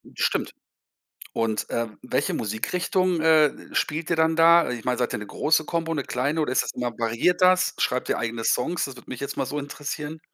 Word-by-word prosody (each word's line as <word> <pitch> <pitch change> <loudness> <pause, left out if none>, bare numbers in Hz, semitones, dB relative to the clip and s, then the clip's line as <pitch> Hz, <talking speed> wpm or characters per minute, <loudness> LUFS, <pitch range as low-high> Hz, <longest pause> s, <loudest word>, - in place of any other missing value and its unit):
Stimmt. - - 0 0.8
Und, 110 -1 -1
äh, 115 -1 -1
welche - - -1
Musikrichtung, 175 - 0
äh, 155 -2 +5 0.2
spielt 155 +2 -1
ihr - - +3
dann 160 0 +2
da? 170 +1 +6
Ich 120 -2 -5
meine, 125 -1 0
seid 125 - 0
ihr - - -1
'ne 105 - -7
große 155 +7 +1
Kombo, 165 0 -2
'ne 140 -4 -2
kleine 140 +7 -1
oder 150 - 0
ist 130 - +3
das - - -5
immer 125 -1 -2
variiert 115 - +1
das? 185 0 +4
Schreibt 125 0 0
ihr - - 0
eigene 115 0 -3
Songs? 170 +11 +1
Das 135 - -6
würde 125 - -14
mich 130 - -5
jetzt 140 - -4
mal - - -1
so 150 - -4
interessieren. 150 +2 -5
150 Hz, 210 wpm, -25 LUFS, 125-165 Hz, 0.8 s, da